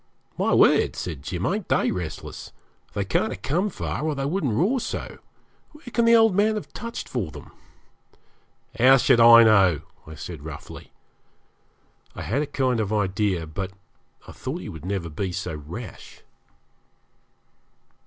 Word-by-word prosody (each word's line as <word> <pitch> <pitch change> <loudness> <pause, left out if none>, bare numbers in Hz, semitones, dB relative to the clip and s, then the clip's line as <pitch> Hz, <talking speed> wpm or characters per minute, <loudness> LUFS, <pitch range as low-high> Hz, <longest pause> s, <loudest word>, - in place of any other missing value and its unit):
'My - - 0
word,' - - +4
said 80 -6 -5
Jim, 90 +5 -4
'ain't 200 +1 -2
they - - +2
restless. 85 -4 -6 0.4
They 100 - -1
can't 100 +3 0
have - - -8
come 180 +9 0
far, - - -4
or 155 -1 -1
they 135 0 -2
wouldn't 145 - -1
roar 215 - +2
so. - - -5 0.5
Where 300 - -17
can 235 - +2
the 230 0 +6
old 225 -3 +5
man 210 +3 +2
have 210 - -6
"touched" 235 0 -6
for 110 -10 -3
them?' 70 - -12 1.3
'How 130 +3 +7
should 130 -1 +4
I 115 0 +9
know?' 95 -8 +4 0.3
I 80 - -9
said - - -8
roughly. - - -9 1.2
I - - -6
had 130 +7 -1
a 150 - -2
kind 130 -4 0
of 105 -2 -1
idea, 95 -4 0
but 95 +5 -5 0.5
I - - -9
thought - - -5
he - - -7
would 80 +1 -9
never 95 -3 -2
be 90 +4 -4
so 90 -1 -4
rash. 85 +9 -9
110 Hz, 160 wpm, -24 LUFS, -, 1.3 s, I